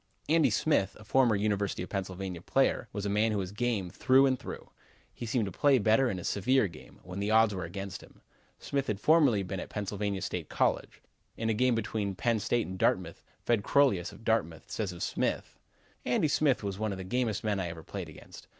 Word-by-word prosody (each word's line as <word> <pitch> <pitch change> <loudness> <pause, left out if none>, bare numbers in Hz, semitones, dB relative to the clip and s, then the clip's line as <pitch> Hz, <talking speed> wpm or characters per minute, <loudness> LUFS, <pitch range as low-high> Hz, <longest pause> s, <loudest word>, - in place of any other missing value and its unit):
Andy 160 0 +4
Smith, 100 -11 +1
a - - -12
former 120 0 +3
University 100 -2 -1
of - - -8
Pennsylvania 95 -2 -4
player, 135 +3 +1
was 100 -1 -4
a - - 0
man 105 +2 +2
who 105 - 0
was 95 -2 -3
game 105 -4 -1
through 130 +6 +4
and 130 -2 +1
through. - - -8 0.4
He 120 - -7
seemed 115 -1 +1
to 95 - -5
play 140 +8 +4
better 115 +4 +3
in 95 - -3
a 90 - -6
severe 125 +4 +2
game, 85 -4 -14
when 90 +2 -7
the 100 +1 -1
odds 110 -1 +4
were 90 -3 -4
against 95 +2 -6
him. - - -18 0.4
Smith 140 -1 -2
had 105 -2 -2
formerly 140 -7 +4
been 95 0 -4
at - - -6
Pennsylvania 100 -1 -3
State - - -4
College. - - -1 0.3
In 115 0 0
a - - +1
game 125 +2 +2
between 105 -3 -2
Penn' 115 +3 +1
State 120 +3 0
and 95 0 -7
Dartmouth, 90 -2 0 0.2
Fred 115 -3 +2
Crolius, 125 -12 +3
of - - -14
Dartmouth, 85 -8 -1
says 105 -4 -2
of 85 - -6
Smith: - - -2 0.4
"Andy 125 +5 +2
Smith 140 -5 +2
was 100 -1 -4
one 110 -1 -1
of 95 - -4
the 95 - -6
gamest 110 +1 -1
men 105 -2 0
I 90 - -2
ever 80 -1 -8
played - - -6
against. - - -13
105 Hz, 215 wpm, -30 LUFS, 95-120 Hz, 0.4 s, Andy